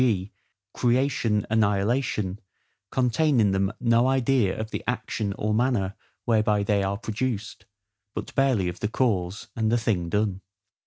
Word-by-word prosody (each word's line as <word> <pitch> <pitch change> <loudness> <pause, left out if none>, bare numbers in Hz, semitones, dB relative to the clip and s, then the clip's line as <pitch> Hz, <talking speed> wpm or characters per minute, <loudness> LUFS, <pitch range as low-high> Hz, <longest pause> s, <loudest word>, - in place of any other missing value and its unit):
g. 105 -6 +1 0.4
CREATION, 120 -4 +1
ANNIHILATION, 105 -1 +1 0.5
contain 130 +2 +2
in 105 -3 +4
them 95 +1 +1
no 120 +1 +3
idea 130 -6 +2
of 110 0 -4
the - - -4
action 110 -4 -2
or 105 +2 -1
manner 110 -5 +1 0.3
whereby 110 -3 +2
they 100 0 +1
are 100 0 -1
produced, 110 0 -4 0.5
but - - -5
barely 130 -9 +2
of 90 - -5
the 105 - -1
cause, 105 -5 -1
and 110 -1 +1
the 120 - +3
thing 100 -7 -1
done. 100 -1 0
110 Hz, 145 wpm, -25 LUFS, 100-125 Hz, 0.5 s, in